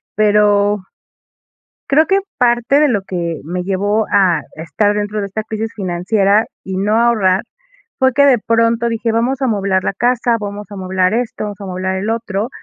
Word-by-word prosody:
pero 205 -1 +3 1.1
creo 305 +3 +4
que 390 +4 +2 0.2
parte 240 +2 +2
de 300 - +4
lo 220 -7 0
que, 170 -4 -4
me 180 +4 -4
llevó 205 +3 0
a 190 -4 +3
estar 170 +7 0
dentro 210 0 -2
de 200 - -2
esta 215 +3 -4
crisis 220 +1 -4
financiera 195 +2 +1 0.2
y 190 -1 -5
no 210 +3 +1
ahorrar, 210 -5 +2 0.6
fue 260 -1 +3
que 280 +1 +5
de 260 -3 +5
pronto 230 +1 +1
dije: 230 0 -1
"Vamos 245 +4 0
a - - +3
amoblar 195 -4 0
la - - 0
casa, 240 +1 +1
vamos 205 0 -6
a - - -8
amoblar 185 0 0
esto, 235 -2 -2
vamos 205 -1 -7
a - - -6
amoblar 185 0 -3
el 200 +4 -2
otro", 225 -1 -2
210 Hz, 180 wpm, -16 LUFS, 190-230 Hz, 1.1 s, que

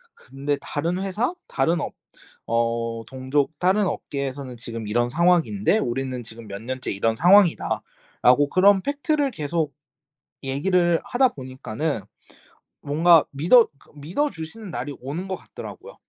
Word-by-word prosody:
근데 140 +2 -3
다른 170 +5 -2
회사 210 - -1
다른 160 +4 +1
업 - - -4 0.6
어 115 0 0
동족 135 +3 -1
다른 190 +3 +3
업계에서는 140 -5 -4
지금 115 -2 -7
이런 120 +3 +1
상황인데 180 - +2
우리는 130 - -3
지금 110 -1 -10
몇 100 +1 -6
년째 130 +2 -4
이런 110 +3 0
상황이다."라고 160 - +3
그런 190 +2 +5
팩트를 285 0 0
계속 155 - -2 0.7
얘기를 170 +5 +2
하다 255 +1 +3
보니까는 130 - -4 0.8
뭔가 160 +3 +5
믿어 175 - +5
그러니까 - - -23
믿어 180 - -1
주시는 195 - -8
날이 145 -1 -4
오는 150 +9 -5
것 190 - -2
같더라고요. - - -10
145 Hz, 305 characters per minute, -24 LUFS, 130-185 Hz, 0.8 s, 그런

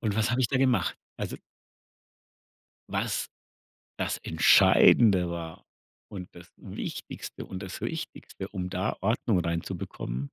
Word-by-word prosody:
Und 105 -3 -1
was 110 0 +2
habe 125 +1 +1
ich 120 - +2
da 135 - +1
gemacht? 130 -7 +2 0.2
Also - - -4 1.5
was - - -1 0.7
das - - -1
Entscheidende 95 -7 +5
war 85 -1 -6 0.5
und 95 -3 -6
das 85 -1 -13
Wichtigste - - -7
und 95 +2 -7
das 95 - -7
Wichtigste, 95 - -6
um 90 -2 -4
da 90 +1 -2
Ordnung 110 -1 +1
reinzubekommen 85 -6 -3
95 Hz, 120 wpm, -28 LUFS, 85-110 Hz, 1.5 s, Entscheidende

